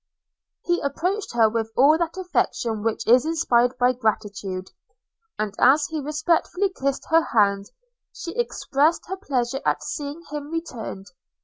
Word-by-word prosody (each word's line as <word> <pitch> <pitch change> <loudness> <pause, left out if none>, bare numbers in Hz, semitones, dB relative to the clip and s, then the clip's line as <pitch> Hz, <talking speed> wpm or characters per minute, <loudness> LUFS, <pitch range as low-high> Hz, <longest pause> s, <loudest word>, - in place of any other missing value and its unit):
He 350 0 0
approached 360 +9 -2
her 225 -2 +5
with 225 0 -2
all 280 +4 +6
that 340 +1 -2
affection 240 - -1
which 225 +1 -2
is 245 +2 +5
inspired 250 -7 +2
by 250 +1 +3
gratitude; 205 -5 -3 0.7
and 215 -2 -2
as 290 +4 +5
he 315 -2 -3
respectfully 330 +6 0
kissed 275 -2 -2
her 330 +1 +6
hand, 200 -7 +1 0.4
she 340 - -7
expressed 330 - +1
her 380 - -3
pleasure 270 -7 -2
at - - 0
seeing 295 +2 -5
him 295 -1 -5
returned. 250 - -5
275 Hz, 140 wpm, -24 LUFS, 225-330 Hz, 0.7 s, all